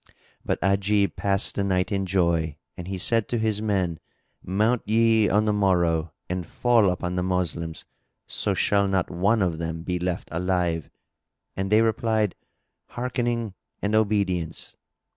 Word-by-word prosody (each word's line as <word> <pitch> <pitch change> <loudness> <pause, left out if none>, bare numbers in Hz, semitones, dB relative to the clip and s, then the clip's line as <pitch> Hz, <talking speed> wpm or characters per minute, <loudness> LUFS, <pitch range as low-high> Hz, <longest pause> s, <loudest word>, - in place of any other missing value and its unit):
But - - -1
Ajib 100 +1 +2
passed 100 -1 +1
the 100 - -1
night 95 -1 0
in 95 -1 -1
joy 85 -5 +1 0.2
and 90 - -8
he 95 0 -3
said 115 +4 +1
to 120 - 0
his 110 -2 0
men, 95 -6 0 0.4
"Mount 110 +6 +1
ye 110 0 +3
on 105 +2 +3
the 105 - +2
morrow 85 -5 +2 0.2
and 90 0 -2
fall 115 +2 +3
upon 90 0 -2
the - - +1
Moslems 85 -3 -2 0.4
so - - -1
shall 100 -1 +2
not 95 -2 0
one 100 +5 +2
of 85 -3 -1
them 80 0 -4
be 90 0 -2
left 90 0 -3
alive." 85 -2 -1 0.7
And 95 +1 -3
they 110 +1 +5
replied, 110 -2 +1 0.5
"Hearkening 120 -3 -2 0.3
and 100 +1 -1
obedience!" 100 -6 0
95 Hz, 150 wpm, -25 LUFS, 90-110 Hz, 0.7 s, they